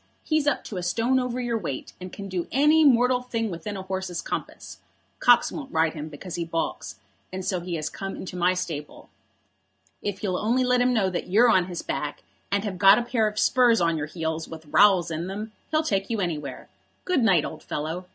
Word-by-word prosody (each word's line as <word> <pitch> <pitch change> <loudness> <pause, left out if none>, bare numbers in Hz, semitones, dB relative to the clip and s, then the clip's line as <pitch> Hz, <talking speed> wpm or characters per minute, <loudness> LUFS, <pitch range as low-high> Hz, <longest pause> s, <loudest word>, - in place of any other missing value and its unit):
He's 310 -2 +1
up 290 - +1
to 200 - -7
a - - -2
stone 230 +8 +1
over 250 -1 -2
your 240 -2 -1
weight, 145 -9 -5
and 185 0 -7
can 200 +1 -7
do 185 -3 -3
any 300 +4 +5
mortal 250 -2 +4
thing 230 -4 -3
within 195 +4 -5
a 190 - -6
horse's 190 -2 -4
compass. - - -6 0.4
Cox 245 -1 +5
won't 285 -4 -7
ride 160 -1 +2
him 155 -1 -6
because 165 +4 -9
he 170 - -2
baulks, 165 0 -3 0.4
and 185 0 -5
so 185 -3 0
he 175 0 -4
has 155 -1 -3
come 195 0 -5
into 185 - -7
my 180 +1 +2
stable. 160 -5 -6 0.9
If 205 -1 -4
you'll 185 -3 0
only 240 +4 +1
let 250 0 +3
him 250 +1 +3
know 205 -6 +1
that 175 - -3
you're 225 +6 +5
on 185 -4 +4
his 175 -2 -6
back, 150 -1 -4 0.3
and 200 0 +1
have 195 -4 -4
got 195 +1 +8
a 240 - 0
pair 235 -3 +1
of 210 0 -5
spurs 240 0 +4
on 165 -1 +2
your 150 -1 -3
heels 160 0 -3
with 160 -1 -10
rowels 185 -5 +5
in 165 +2 -3
them, 210 +3 -5 0.2
he'll 310 0 +1
take 195 -9 -1
you 225 -2 -1
anywhere. 150 -7 -4 0.4
Good 365 -7 +2
night, 190 -9 +4
old - - -7
fellow. 160 +5 -4
190 Hz, 220 wpm, -25 LUFS, 170-235 Hz, 0.9 s, got